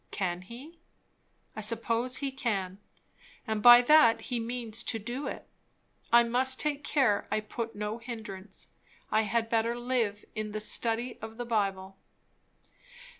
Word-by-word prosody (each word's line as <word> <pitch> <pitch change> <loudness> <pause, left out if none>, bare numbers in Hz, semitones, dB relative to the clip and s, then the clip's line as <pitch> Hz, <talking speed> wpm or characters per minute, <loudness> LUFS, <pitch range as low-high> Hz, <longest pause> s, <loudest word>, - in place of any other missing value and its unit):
Can 180 -2 -3
he? 260 - -12 0.8
I 215 - -5
suppose 230 +3 +1
he 275 0 -3
can, 200 -8 -3 0.7
and 220 -3 -2
that 240 +1 +7
he 245 -3 -3
means 230 -1 -3
to 225 - -1
do 240 +6 -5
it. - - -7 0.6
I 235 0 +7
must 255 +3 +2
take 290 -1 -1
care 255 -10 +1
I 215 - 0
put 225 +1 -6
no 210 +2 -4
hindrance. 215 -5 -8 0.4
I 215 - +3
had 225 +2 0
better 230 +1 0
live 240 -4 -1
in 215 -1 -5
the 215 - -3
study 230 +3 -2
of 220 +1 -8
the 245 - -4
Bible. 195 -4 -2
230 Hz, 140 wpm, -29 LUFS, 210-245 Hz, 0.8 s, that